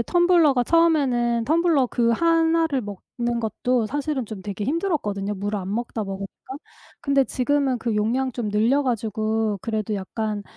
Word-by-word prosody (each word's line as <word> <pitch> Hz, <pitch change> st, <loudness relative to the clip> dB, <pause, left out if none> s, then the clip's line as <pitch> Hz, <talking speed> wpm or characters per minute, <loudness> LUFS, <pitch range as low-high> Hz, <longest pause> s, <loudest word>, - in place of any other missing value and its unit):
텀블러가 335 Hz, -3 st, +3 dB
처음에는 255 Hz, -8 st, +2 dB
텀블러 320 Hz, -3 st, +2 dB
그 235 Hz, -1 st, +1 dB
1 330 Hz, +3 st, +3 dB
를 275 Hz, -4 st, -1 dB
먹는 235 Hz, +4 st, -4 dB
것도 230 Hz, +2 st, 0 dB
사실은 285 Hz, -1 st, -2 dB
좀 210 Hz, -2 st, -8 dB
되게 205 Hz, +1 st, -5 dB
힘들었거든요 245 Hz, -, -1 dB
물을 205 Hz, +2 st, -3 dB
안 190 Hz, +1 st, -5 dB
먹다 235 Hz, -1 st, -3 dB
먹으니까. 195 Hz, -1 st, -6 dB, 0.7 s
근데 280 Hz, -1 st, +3 dB
지금은 270 Hz, 0 st, 0 dB
그 225 Hz, -1 st, -2 dB
용량 245 Hz, +5 st, 0 dB
좀 230 Hz, -3 st, -3 dB
늘려 230 Hz, +8 st, +2 dB
가지고 220 Hz, -3 st, -1 dB
그래도 215 Hz, -2 st, -2 dB
약간 210 Hz, +2 st, -3 dB
240 Hz, 325 characters per minute, -23 LUFS, 215-285 Hz, 0.7 s, 텀블러가